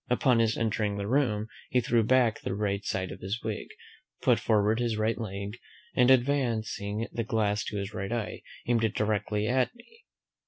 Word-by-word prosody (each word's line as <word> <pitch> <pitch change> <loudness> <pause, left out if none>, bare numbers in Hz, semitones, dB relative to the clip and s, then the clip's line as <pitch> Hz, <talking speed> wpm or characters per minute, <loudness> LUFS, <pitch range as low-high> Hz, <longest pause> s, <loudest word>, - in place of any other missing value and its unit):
Upon 125 0 +3
his 115 -1 +2
entering 105 -2 0
the 100 - -3
room, 110 -3 +1 0.2
he 125 - +3
threw 120 0 +2
back 120 0 +3
the 95 - -3
right 100 -1 -1
side 95 -1 -2
of - - -8
his 100 +5 -4
wig, 110 -2 -3 0.6
put - - +4
forward 110 +1 +2
his 120 -3 0
right 110 +1 +1
leg, 100 0 -5 0.4
and 125 -1 +5
advancing 115 -5 +1
the 115 - -2
glass 105 -1 0
to 105 - -4
his 100 +1 -4
right 95 +2 -4
eye, 115 -2 -3 0.2
aimed 115 -1 +2
it 110 -2 0
directly 105 0 0
at 130 - +1
me. 460 - -20
110 Hz, 185 wpm, -29 LUFS, 105-120 Hz, 0.6 s, and